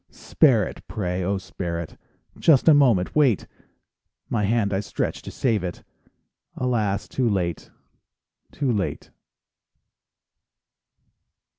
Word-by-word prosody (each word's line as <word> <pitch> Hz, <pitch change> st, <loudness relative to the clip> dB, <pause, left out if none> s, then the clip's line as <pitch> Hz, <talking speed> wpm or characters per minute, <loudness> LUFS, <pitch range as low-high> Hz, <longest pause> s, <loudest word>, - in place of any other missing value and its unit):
Spare 120 Hz, -10 st, +2 dB
it, -, -, -10 dB
pray, 90 Hz, -3 st, -3 dB
oh, 100 Hz, +2 st, 0 dB
spare 90 Hz, -3 st, -5 dB
it, 85 Hz, -, -7 dB, 0.4 s
Just 150 Hz, -3 st, +4 dB
a 160 Hz, -, +9 dB
moment 120 Hz, -11 st, +3 dB
wait! 135 Hz, -9 st, +3 dB, 0.8 s
My 105 Hz, -3 st, 0 dB
hand 105 Hz, -1 st, +1 dB
I 95 Hz, -, +1 dB
stretch 100 Hz, -, -3 dB
to -, -, -9 dB
save 110 Hz, -7 st, 0 dB
it— 90 Hz, -2 st, -5 dB, 0.7 s
Alas, 110 Hz, -6 st, -1 dB
too 125 Hz, -3 st, 0 dB
late, 90 Hz, -5 st, -2 dB, 0.8 s
too 135 Hz, -3 st, -1 dB
late! 100 Hz, -4 st, -3 dB
105 Hz, 115 wpm, -24 LUFS, 95-125 Hz, 0.8 s, a